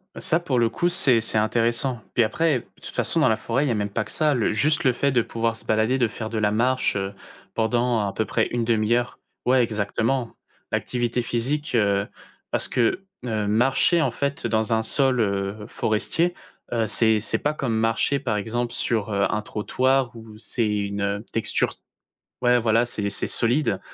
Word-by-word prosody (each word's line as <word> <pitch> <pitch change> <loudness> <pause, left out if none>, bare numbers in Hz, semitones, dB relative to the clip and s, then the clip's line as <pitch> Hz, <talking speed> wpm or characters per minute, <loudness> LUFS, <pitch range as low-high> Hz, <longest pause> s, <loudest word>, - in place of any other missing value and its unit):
Ça 170 -2 +1
pour 145 -7 -1
le 115 -1 +3
coup, 175 +9 0
c'est 130 -10 +4
c'est 110 - 0
intéressant. 115 +3 +1
Puis 120 - +5
après, 140 +5 +1
de - - -23 0.2
toute - - -9
façon - - +1
dans - - +4
la 110 - +3
forêt, 120 +5 -1
il - - -1
y - - +1
a - - 0
même 105 -1 -2
pas 110 +2 -1
que - - -13
ça, 155 -1 +2
le 120 -5 +1
juste 150 +8 +1
le 130 -3 +3
fait 140 +3 +1
de 125 -2 +3
pouvoir 115 0 -2
se - - -6
balader, 110 +4 +2
de 120 - +3
faire 110 +1 -6
de 110 -1 -2
la 105 -1 +2
marche, 125 +3 +1
heu, 95 0 -3 0.4
pendant 115 -1 +1
à 100 - -4
peu 110 - -1
près - - 0
une 120 -1 -2
1/2 115 0 +2
heure 120 0 -2 0.3
ouais, 130 +1 +4
exactement, 115 +3 -1 0.4
l'activité 120 0 -1
physique, 130 +6 -2
heu, 100 -2 +2 0.4
parce - - 0
que, 125 +10 0 0.2
heu, 110 -3 -1
marcher 135 - +3
en - - +2
fait 140 -3 -2
dans 110 0 0
un 110 - +2
sol, 130 +2 +2
heu, 100 0 -1
forestier, 165 +11 0 0.4
heu, 115 -2 +1
c'est 110 +1 +3
c'est 110 - 0
pas 150 - -1
comme 125 -7 -2
marcher 115 +5 +1
par 120 -6 -1
exemple, 115 +3 -2
sur, 110 -3 -1
heu, 100 0 +2
un 105 - -1
trottoir 130 +4 0
où 110 -1 -11
c'est 115 +1 -1
une, 100 -1 -2
heu, 100 +2 -2
texture 115 - +1
s - - -10 0.6
ouais, 125 0 +4
voilà, 115 +1 +2
c'est 105 -4 -1
c'est - - 0
solide. 120 -4 +2
115 Hz, 205 wpm, -24 LUFS, 110-125 Hz, 0.6 s, Puis